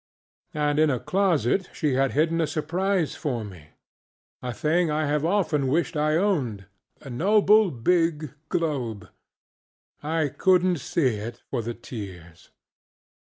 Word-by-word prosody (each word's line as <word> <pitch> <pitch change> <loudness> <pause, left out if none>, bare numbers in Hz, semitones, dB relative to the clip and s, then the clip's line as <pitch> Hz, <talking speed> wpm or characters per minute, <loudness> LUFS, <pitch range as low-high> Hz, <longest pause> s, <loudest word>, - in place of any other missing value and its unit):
And 150 0 +1
in 155 0 +4
a 130 -4 0
closet 185 - +1
she 150 -5 0
had 135 +1 +1
hidden 165 +3 +2
a 160 - +1
surprise 170 +3 -1
for 125 -6 -3
meŌĆöa 100 +6 -12
thing 165 +2 +1
I 155 +1 0
have 150 +1 0
often 165 -6 +1
wished 165 +5 0
I 155 +1 +1
owned: 140 - 0 0.4
a 135 - -9
noble 205 - +4
big 155 +2 0 0.2
globe. 130 -11 -2 0.9
I 155 -1 -1
couldnŌĆÖt 185 -2 +3
see 130 -4 0
it 115 +3 -7
for 125 - -1
the 115 +1 -5
tears. 95 -8 -10
150 Hz, 130 wpm, -25 LUFS, 120-170 Hz, 0.9 s, in